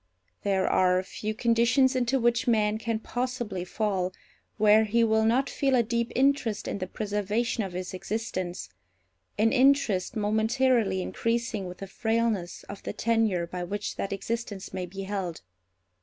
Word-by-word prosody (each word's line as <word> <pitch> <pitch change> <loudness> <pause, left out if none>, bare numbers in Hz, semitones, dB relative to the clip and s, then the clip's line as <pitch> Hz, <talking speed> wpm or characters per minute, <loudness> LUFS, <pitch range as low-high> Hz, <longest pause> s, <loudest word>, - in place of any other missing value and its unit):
There 195 -2 +1
are 185 0 +3
few 215 +3 -5
conditions 235 +3 +3
into 255 +1 +1
which 240 0 +1
man 215 -2 +2
can 230 0 -1
possibly 240 -5 -3
fall 190 -1 -1 0.5
where 215 0 +6
he 230 +2 +2
will 220 -1 +3
not 250 +5 +3
feel 270 -2 +1
a 240 - +4
deep 235 +1 -1
interest 260 -5 +1
in - - -3
the 185 - -3
preservation 210 +4 -1
of 190 -2 -6
his 180 +1 -5
existence; 185 - -4 0.7
an 220 +2 +3
interest 260 -6 +3
momentarily 220 -1 +2
increasing 230 -4 -2
with 180 - -8
the 195 - -6
frailness 220 -2 -1
of 200 - -9
the - - -5
tenure 220 -6 +1
by 180 +1 -5
which 205 +4 -4
that 195 - -3
existence 205 -1 -4
may 185 -1 -3
be 195 +2 -7
held. 190 -4 -4
215 Hz, 155 wpm, -27 LUFS, 190-235 Hz, 0.7 s, where